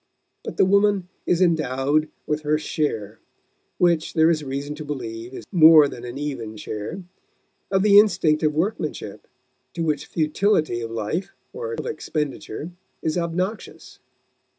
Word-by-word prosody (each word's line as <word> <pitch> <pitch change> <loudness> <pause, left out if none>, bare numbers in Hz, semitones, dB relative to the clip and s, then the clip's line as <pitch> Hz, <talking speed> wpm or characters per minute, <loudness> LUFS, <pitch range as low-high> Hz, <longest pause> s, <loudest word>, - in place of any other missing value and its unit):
But - - -7
the - - +5
woman 200 -1 +2 0.2
is 180 +1 +3
endowed 155 -2 +1 0.2
with 150 0 -1
her 150 0 +1
share 115 - -3 0.6
which 170 -2 +2
there 160 0 +5
is 155 -2 -1
reason 140 +2 -4
to 155 - -6
believe 120 -5 -6
is - - -9
more 160 -4 +8
than 120 -3 -9
an 120 +2 -7
even 125 -7 -5
share 110 - -6 0.7
of 190 -1 +2
the 205 -1 +8
instinct 160 -7 +3
of 155 -2 +2
workmanship, 155 - -3 0.5
to 170 - -2
which 150 -2 -1
futility 155 - +1
of 115 - -4
life 115 - -3 0.2
or 470 0 -5
of - - -5
expenditure 155 - -4 0.3
is 155 - 0
obnoxious. 180 +5 -4
155 Hz, 145 wpm, -23 LUFS, 135-180 Hz, 0.7 s, more